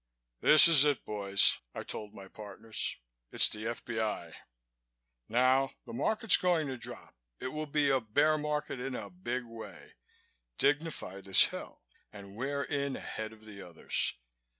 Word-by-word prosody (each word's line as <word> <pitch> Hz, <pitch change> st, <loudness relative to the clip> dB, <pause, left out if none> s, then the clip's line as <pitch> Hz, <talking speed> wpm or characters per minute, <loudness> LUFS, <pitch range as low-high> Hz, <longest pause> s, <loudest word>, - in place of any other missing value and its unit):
"This 155 Hz, +2 st, +8 dB
is 155 Hz, -4 st, +8 dB
it, 145 Hz, -3 st, +1 dB
boys," 100 Hz, -2 st, +3 dB, 0.2 s
I -, -, -5 dB
told 105 Hz, -1 st, -7 dB
my 95 Hz, -1 st, -12 dB
partners. 105 Hz, +2 st, -5 dB, 0.3 s
"It's -, -, +5 dB
the 110 Hz, +1 st, -4 dB
F.B.I. 110 Hz, -2 st, -4 dB, 1.0 s
Now, 130 Hz, +3 st, +2 dB
the 115 Hz, -, -10 dB
Market's 215 Hz, -, +3 dB
going 175 Hz, -4 st, +1 dB
to 130 Hz, -, -4 dB
drop. 120 Hz, -, -7 dB, 0.3 s
It 130 Hz, -, -4 dB
will 155 Hz, +2 st, -5 dB
be 145 Hz, -1 st, +1 dB
a 135 Hz, -1 st, +2 dB
bear 145 Hz, +8 st, +2 dB
market 150 Hz, -3 st, -3 dB
in 130 Hz, 0 st, -4 dB
a 100 Hz, -5 st, -7 dB
big 120 Hz, +8 st, -5 dB
way, 115 Hz, -1 st, -12 dB, 0.6 s
dignified 140 Hz, -, -1 dB
as 95 Hz, -, +7 dB
hell, -, -, -6 dB, 0.3 s
and 100 Hz, -1 st, -12 dB
we're 140 Hz, +4 st, -3 dB
in 140 Hz, -1 st, -2 dB
ahead 110 Hz, 0 st, -6 dB
of 110 Hz, -1 st, -16 dB
the 100 Hz, -2 st, -11 dB
others. 85 Hz, -3 st, -2 dB
125 Hz, 150 wpm, -31 LUFS, 105-145 Hz, 1.0 s, This